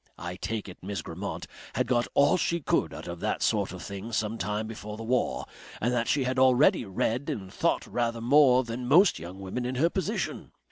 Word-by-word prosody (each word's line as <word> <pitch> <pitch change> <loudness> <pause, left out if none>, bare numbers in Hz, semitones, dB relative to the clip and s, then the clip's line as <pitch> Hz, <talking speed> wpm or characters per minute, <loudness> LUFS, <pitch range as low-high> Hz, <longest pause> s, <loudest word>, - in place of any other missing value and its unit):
I 90 +1 -5
take 110 +2 -4
it 90 - -10
Miss 95 -3 -4
Grammont 95 +5 -5 0.3
had 125 - +1
got 120 -1 +1
all 140 0 +5
she 170 -1 0
could 150 - +1
out - - -8
of 85 0 -6
that - - -1
sort - - +1
of - - -8
thing 100 +3 -6
some 110 0 -1
time 105 +3 -2
before 105 -1 -7
the 115 - -6
war, 125 +2 0 0.3
and 120 +3 0
that 120 -1 0
she 140 - +2
had 130 0 0
already 130 -1 +5
read 115 +7 -1
and 95 -3 -5
thought - - +1
rather 115 -1 -1
more 130 +1 +5
than 120 +1 -5
most 165 - +5
young 85 +4 -8
women 95 +6 -4
in 125 +1 -2
her 165 +7 +2
position. 200 +3 -3
115 Hz, 215 wpm, -28 LUFS, 100-130 Hz, 0.3 s, all